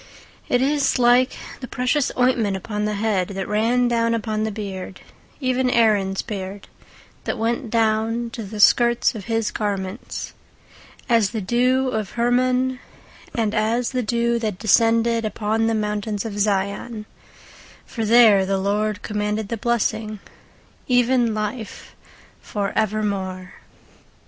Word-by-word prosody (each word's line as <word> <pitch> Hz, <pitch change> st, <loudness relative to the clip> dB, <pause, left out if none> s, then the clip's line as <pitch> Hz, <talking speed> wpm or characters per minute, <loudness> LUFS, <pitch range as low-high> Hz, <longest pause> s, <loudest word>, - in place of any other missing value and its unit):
19:133:002 -, -, +2 dB
It 245 Hz, -, +3 dB
is 285 Hz, 0 st, +1 dB
like 250 Hz, +1 st, +4 dB, 0.3 s
the 255 Hz, -, -7 dB
precious 250 Hz, +4 st, 0 dB
ointment 240 Hz, -6 st, +2 dB
upon 210 Hz, +2 st, -3 dB
the 210 Hz, 0 st, -1 dB
head, 200 Hz, -3 st, 0 dB
that 195 Hz, -1 st, -5 dB
ran 230 Hz, +4 st, +2 dB
down 230 Hz, -1 st, +1 dB
upon 215 Hz, -1 st, -2 dB
the 220 Hz, -, -2 dB
beard, 195 Hz, -3 st, -6 dB, 0.4 s
even 255 Hz, -2 st, +1 dB
Aaron's 210 Hz, -5 st, +2 dB
beard: 195 Hz, -2 st, -6 dB, 0.6 s
that -, -, -2 dB
went 230 Hz, +2 st, -1 dB
down 225 Hz, +1 st, 0 dB
to 230 Hz, -, -6 dB
the 210 Hz, 0 st, -7 dB
skirts 235 Hz, +3 st, +4 dB
of 210 Hz, -4 st, -8 dB
his 225 Hz, -2 st, -1 dB
garments; 200 Hz, 0 st, -4 dB, 0.7 s
19:133:003 -, -, -28 dB
As 210 Hz, -4 st, +2 dB
the 225 Hz, -2 st, -4 dB
dew 250 Hz, +6 st, +2 dB
of 215 Hz, -5 st, -2 dB
Hermon, 250 Hz, +2 st, +1 dB, 0.6 s
and 220 Hz, -3 st, 0 dB
as 230 Hz, +2 st, 0 dB
the 255 Hz, -1 st, 0 dB
dew 235 Hz, +1 st, 0 dB
that 215 Hz, -5 st, -2 dB
descended 230 Hz, +2 st, +3 dB
upon 220 Hz, +1 st, -1 dB
the 225 Hz, -, +1 dB
mountains 210 Hz, 0 st, -2 dB
of 205 Hz, -2 st, -5 dB
Zion: 205 Hz, +2 st, -1 dB, 0.8 s
for 225 Hz, -, -4 dB
there 220 Hz, -3 st, +6 dB
the 195 Hz, +1 st, 0 dB
LORD 205 Hz, +2 st, -1 dB
commanded 210 Hz, 0 st, -2 dB
the 230 Hz, -, -1 dB
blessing, 220 Hz, -1 st, -1 dB, 0.7 s
even 245 Hz, -3 st, +2 dB
life 215 Hz, +1 st, -5 dB, 0.5 s
for 200 Hz, -2 st, -3 dB
evermore. 200 Hz, -4 st, -2 dB
220 Hz, 140 wpm, -22 LUFS, 210-240 Hz, 0.8 s, there